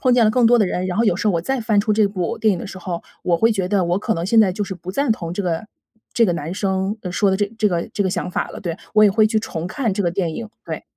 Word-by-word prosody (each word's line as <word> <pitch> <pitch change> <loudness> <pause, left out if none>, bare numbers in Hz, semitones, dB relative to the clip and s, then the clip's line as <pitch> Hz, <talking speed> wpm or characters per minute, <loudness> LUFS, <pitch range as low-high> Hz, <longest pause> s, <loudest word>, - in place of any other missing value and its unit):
碰 255 - +3
见 240 -2 +5
了 215 - +4
更 245 -1 +4
多 240 +1 +5
的 210 - +3
人， 180 0 -2
然 180 - -3
后 230 - +3
有 205 -6 +3
时 205 - -2
候 190 - +2
我 165 - +1
再 265 +9 -2
翻 220 -2 +1
出 215 +1 0
这 210 -1 +3
部 195 +2 -3
电 220 -1 +3
影 - - -5
的 - - -6
时 190 - -9
候， 175 -2 -5 0.2
我 175 -1 +2
会 225 +6 +3
觉 190 -4 -1
得 190 -2 +2
我 175 +2 +1
可 220 - 0
能 165 0 -3
现 225 +3 +5
在 195 -4 +3
就 205 +3 -2
是 190 - -6
不 180 0 -8
赞 265 +4 +1
同 170 -6 -5
这 200 - -2
个 175 +2 -2 0.5
这 235 - +4
个 185 - +2
男 160 +1 -4
生 190 +1 -1
说 195 +3 +2
的 190 - +1
这 205 +1 +1
这 215 - +3
个 170 -3 -2
这 205 - 0
个 - - +1
想 180 - -3
法 - - -2
了， - - -8
对， 170 -3 -4 0.2
我 215 - +6
也 205 - +6
会 215 +2 +4
去 220 0 +1
重 165 -6 -5
看 235 +1 -1
这 200 +2 -1
个 175 - +1
电 170 -3 -2
影， 230 - -6 0.2
对。 - - -5
200 Hz, 355 characters per minute, -20 LUFS, 180-220 Hz, 0.5 s, 我